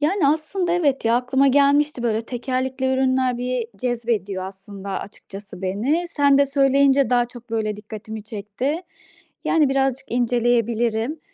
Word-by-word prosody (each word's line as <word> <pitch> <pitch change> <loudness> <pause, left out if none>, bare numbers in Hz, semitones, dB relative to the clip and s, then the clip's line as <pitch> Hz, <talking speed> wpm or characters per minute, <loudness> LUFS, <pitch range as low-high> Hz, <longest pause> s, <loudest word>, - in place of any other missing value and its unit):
Yani, 310 0 +2
aslında 340 +4 0
evet, 290 -8 +1
ya, 230 +1 +3
aklıma 265 +2 +2
gelmişti, 285 0 +3
böyle, 225 -1 0
tekerlekli 260 +1 -2
ürünler 260 -1 +1
bir 250 -1 -2
cezbediyor 220 -5 -2
aslında 195 +1 -9
açıkçası 195 0 -8
beni. 260 - 0
Sen 285 -3 +3
de 280 - +4
söyleyince 275 -1 +3
daha 245 -1 +4
çok, 240 0 -13
böyle, 215 -2 -1
dikkatimi 215 0 -8
çekti. 215 - -4 0.6
Yani, 310 -4 +3
birazcık 270 -1 0
inceleyebilirim. 240 +2 0
250 Hz, 130 wpm, -22 LUFS, 220-275 Hz, 0.6 s, de